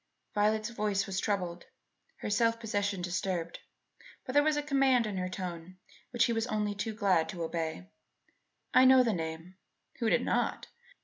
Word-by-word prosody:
Violet's 215 +2 +1
voice 210 -3 0
was 195 0 -3
troubled, 180 -5 -2 0.5
her - - -3
self 230 +2 +2
possession 205 -4 -2
disturbed; 180 -1 -2 0.7
but 255 - -5
there 290 - +6
was 305 0 +2
a 295 - -1
command 270 -4 +3
in 205 -3 -4
her 185 0 -2
tone 180 -1 -6 0.3
which 240 -1 +2
he 235 - 0
was 225 +1 -1
only 210 -2 -1
too 210 +2 -4
glad 190 -6 +2
to 175 -2 -4
obey. 160 - -3 0.9
"I 255 - +7
know 260 0 +7
the 230 -3 +1
name" 165 +2 -5 0.4
(who 230 -3 +1
did - - +2
not!) - - 0
205 Hz, 170 wpm, -31 LUFS, 180-230 Hz, 0.9 s, I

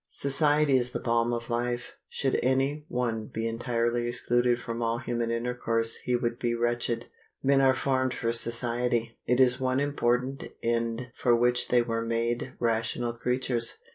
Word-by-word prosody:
Society 145 0 +2
is 125 0 -1
the - - -2
balm 115 0 +1
of 120 0 -4
life. 120 +1 -2 0.2
Should 135 -1 0
any 135 +4 0
one 115 -3 -2
be 115 0 -3
entirely 120 +1 -1
excluded 120 0 +1
from 115 0 -5
all 115 0 0
human 120 -1 -2
intercourse 115 -1 -1
he 125 - -1
would 120 0 -1
be 120 -1 0
wretched. 120 0 -1 0.4
Men 135 0 +4
were 130 -1 +4
formed 130 -1 0
for 115 -2 -1
society. 115 0 +1
It 125 +1 +2
is 130 0 +4
one 130 0 +1
important 135 -2 0 0.2
end 115 +1 -1
for 120 -1 +3
which 120 +1 +2
they 120 -1 +3
were 115 -1 -2
made 115 +2 -2
rational 115 +1 -1
creatures. 125 0 -1
120 Hz, 160 wpm, -28 LUFS, 115-125 Hz, 0.4 s, Men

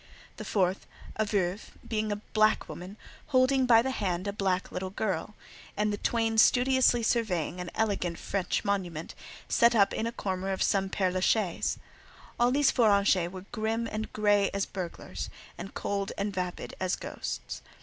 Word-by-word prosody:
The - - -7
fourth, 190 -2 0 0.3
a 215 - +1
"Veuve," 200 -1 -2
being 215 -2 -1
a - - 0
black 215 +1 +1
woman, 185 +4 -8 0.3
holding 260 -1 +3
by 230 -1 +6
the 265 - -1
hand 185 -6 -2
a 200 - -2
black 190 -3 -1
little 185 +1 -4
girl, 210 +1 -3 0.4
and 210 0 +1
the - - -2
twain 225 0 +1
studiously 250 0 +4
surveying 185 -8 0
an 180 - -5
elegant 195 -6 0
French 195 0 -2
monument, 180 -5 -2 0.3
set 235 0 +4
up 200 -2 +4
in 225 - -1
a - - -2
corner 190 -4 -3
of 190 - 0
some 195 -1 +1
Père 185 -2 0
la 185 - 0
Chaise. 190 -1 +1 0.6
All 240 0 +4
these 280 +2 +3
four 235 -4 +4
"Anges" 200 -3 +3
were 185 0 -9
grim 225 0 -1
and 215 +1 -4
grey 205 -2 +3
as 200 - 0
burglars, 180 -3 -6 0.3
and 195 - -8
cold 200 -1 -2
and 200 0 -2
vapid 180 -1 -4
as 185 -1 0
ghosts. - - -6
205 Hz, 170 wpm, -29 LUFS, 185-225 Hz, 0.6 s, by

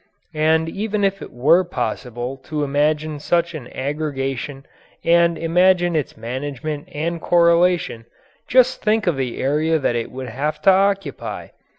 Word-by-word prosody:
And 160 +1 +2
even 205 +4 -2
if 195 0 0
it - - -9
were 155 +9 +4
possible 125 -7 -4
to 150 -1 -2
imagine 150 +2 0
such 170 +3 0
an 145 -6 -7
aggregation 135 -1 -3 0.4
and 170 0 +4
imagine 175 +1 +3
its 150 -4 -2
management 140 +5 -5
and 165 +3 -3
correlation, 170 -7 +2 0.4
just 255 0 +3
think 215 0 +2
of 175 -4 +2
the 130 -3 -3
area 155 +4 +1
that 135 -5 0
it 115 -1 -2
would 130 -1 -6
have 150 +6 -3
to 195 - +7
occupy! 195 +1 -1
155 Hz, 145 wpm, -21 LUFS, 135-175 Hz, 0.4 s, to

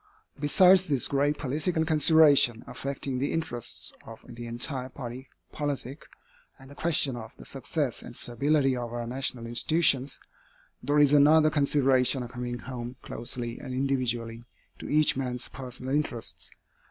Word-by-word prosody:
Besides 185 +6 +5
this 140 -5 +1
grave 145 +1 0
political 155 +4 -1
consideration, 150 -6 +5
affecting 135 +1 -4
the 140 - -1
interests 145 -8 -3
of 115 -1 -11
the 120 -1 -8
entire 125 +2 -4
body 125 0 -8 0.2
politic, 145 -2 -5 0.5
and 135 0 -15
the - - -12
question 150 -5 +1
of 115 -1 -10
the - - -13
success 135 +1 -3
and 120 - -11
stability 135 +2 +1
of 120 -2 -5
our 120 0 -4
national 125 -1 -2
institutions, 135 +2 +1 0.6
there 145 +1 0
is 145 -1 +5
another 155 +2 +5
consideration 135 -3 +2
coming 120 0 -5
home 120 +1 -7
closely 120 -1 -5
and 130 - -6
individually 120 -3 -2 0.3
to - - -8
each 150 0 +4
man's 125 -2 -3
personal 130 0 -6
interests. 115 - -3
130 Hz, 140 wpm, -27 LUFS, 120-145 Hz, 0.6 s, Besides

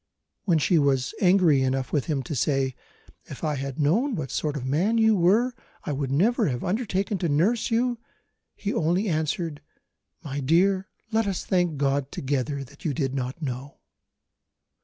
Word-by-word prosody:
When 175 -5 +3
she 165 +2 +3
was 135 -2 +1
angry 180 -7 +5
enough 130 0 -1
with 145 -4 +1
him 145 -5 -1
to 150 - -5
say, 135 0 +1 0.5
"If 140 - -10
I 155 -1 +1
had 135 0 -4
known 220 - +2
what 145 -7 -4
sort 150 -1 -1
of 130 - -5
man 175 +12 +1
you 220 -1 +4
were, 210 +8 +3 0.3
I - - -3
would 140 -1 -2
never 210 - +2
have 125 -3 -2
undertaken 200 -1 -1
to 170 - 0
nurse 190 +11 +2
you," 240 +1 +1 0.6
he 205 - -3
only 175 +6 +1
answered, 160 -2 -2 0.6
"my 145 -2 -4
dear, 185 +7 +2 0.2
let 225 -1 +1
us 195 -2 -2
thank 175 -5 +1
God 140 0 0
together 140 +1 -2
that 140 +2 -16
you 150 -5 -1
did 135 -4 -1
not 130 +4 -4
know." 135 +1 -5
155 Hz, 170 wpm, -25 LUFS, 135-195 Hz, 0.6 s, angry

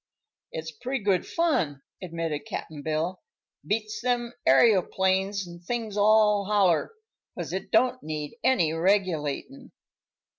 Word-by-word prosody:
"It's 160 0 -5
pretty 250 - -4
good 195 -3 +1
fun," 165 - 0 0.2
admitted 165 -4 -4
Cap'n 155 -3 -6
Bill. 160 +4 -2 0.4
"Beats 215 0 -2
them 240 -1 -1
aëroplanes 190 - +3
an' 170 0 -10
things 220 +3 -4
all 210 -1 +4
holler, 195 - +2 0.4
'cause - - -5
it - - -4
don't 255 0 +2
need 150 -1 -5
any 245 -12 +3
regulatin'." 185 - -1
195 Hz, 115 wpm, -27 LUFS, 165-220 Hz, 0.4 s, all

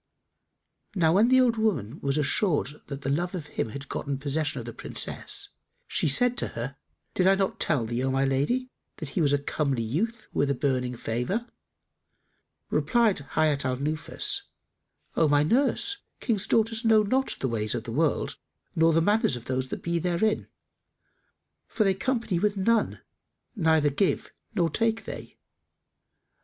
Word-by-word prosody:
Now 165 -3 +3
when 210 +5 +5
the 260 +1 +5
old 240 -3 +3
woman 175 - -1
was 140 +1 0
assured 150 0 +1
that 140 -1 -6
the 135 - -3
love 175 +6 -1
of 165 -5 -5
him 115 - -3
had 140 +4 -7
gotten 140 0 -3
possession 145 +2 -1
of 115 - -7
the 120 - -6
Princess, - - -3 0.4
she - - 0
said 245 - +4
to - - 0
her, 125 +4 -4 0.4
"Did 185 - +2
I 195 - +6
not 195 -1 -1
tell 140 -8 +1
thee, 120 +3 -2
O 135 - +1
my 135 +1 +2
lady, 195 - 0 0.3
that 155 - -5
he 170 - -1
was 145 -3 +3
a 145 - +4
comely 140 -3 -1
youth 200 - -2
with 140 - +1
a 140 - +1
beaming 125 -2 0
favour?" 125 - -2 1.3
Replied 230 -7 +2
Hayat 150 -3 +2
al 130 -1 -1
Nufus, 155 +4 -1 0.7
"O 160 - +4
my 145 0 +4
nurse, 270 - +1 0.2
King's 215 -5 0
daughters 225 0 +1
know 220 -2 +5
not 260 +6 0
the 135 - 0
ways 110 -3 -1
of - - -3
the - - -6
world - - 0 0.4
nor 165 0 +4
the 165 +1 +3
manners 210 - +2
of 120 -1 -8
those 130 0 -1
that - - -6
be 170 0 0
therein, 180 +5 0 1.2
for 215 - 0
that 195 - +3
they - - +1
company 220 -2 -1
with 205 +1 +1
none, 225 +3 +1 0.5
neither 160 -6 +3
give 180 +7 +1
they - - -17 0.2
nor 175 -4 +3
take 225 +4 0
they. - - -8
160 Hz, 175 wpm, -27 LUFS, 140-215 Hz, 1.3 s, I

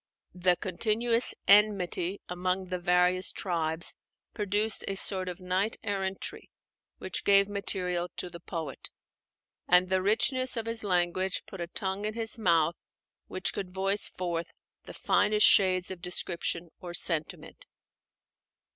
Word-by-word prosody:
The 180 0 +2
continuous 225 +6 0
enmity 200 -2 +3
among 180 +1 -2
the 180 -1 -3
various 180 +1 +2
tribes 165 -2 0 0.4
produced 210 +1 +1
a 195 - -1
sort 190 -1 +2
of 180 - -7
knight 185 +4 -1
errantry 195 -2 -4 0.5
which 185 - -3
gave 200 0 +5
material 180 -3 -2
to - - -4
the 170 - -9
poet; 160 -5 -6 0.8
and 180 +1 +4
the 190 0 +1
richness 255 +6 +1
of 225 - -3
his 230 -1 0
language 185 0 0
put 195 - -9
a 170 - -3
tongue 190 +3 -3
in 215 +1 -3
his 225 0 -2
mouth 165 -5 +3 0.5
which 185 0 -3
could 190 -2 -6
voice 195 +2 +1
forth 170 -2 -3 0.4
the - - -10
finest 210 0 +3
shades 185 -2 +4
of 185 -2 -8
description 175 -1 -3
or 175 -1 -7
sentiment. 160 -4 -1
185 Hz, 135 wpm, -29 LUFS, 180-205 Hz, 0.8 s, gave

